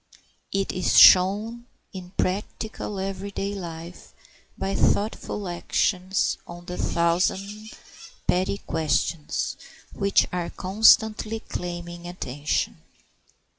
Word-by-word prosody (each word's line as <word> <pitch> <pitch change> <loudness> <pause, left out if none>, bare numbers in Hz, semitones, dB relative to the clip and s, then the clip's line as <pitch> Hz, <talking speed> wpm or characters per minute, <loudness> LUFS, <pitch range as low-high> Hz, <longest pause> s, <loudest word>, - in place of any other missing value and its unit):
It 195 0 0
is 185 - +1
shown 210 +6 +6 0.3
in 185 -2 -8
practical 205 +1 -3
every 195 +1 -4
day 200 0 -3
life 170 -2 -8 0.4
by 195 0 -2
thoughtful 205 0 0
actions 185 +2 0
on 175 0 -10
the 180 - -5
thousand 190 +6 0 0.6
petty 185 +2 +1
questions 160 -2 -1 0.4
which 200 -1 +3
are 175 -1 -2
constantly 220 +2 +3
claiming 175 0 -6
attention. 145 -5 -2
185 Hz, 95 wpm, -25 LUFS, 175-200 Hz, 0.6 s, shown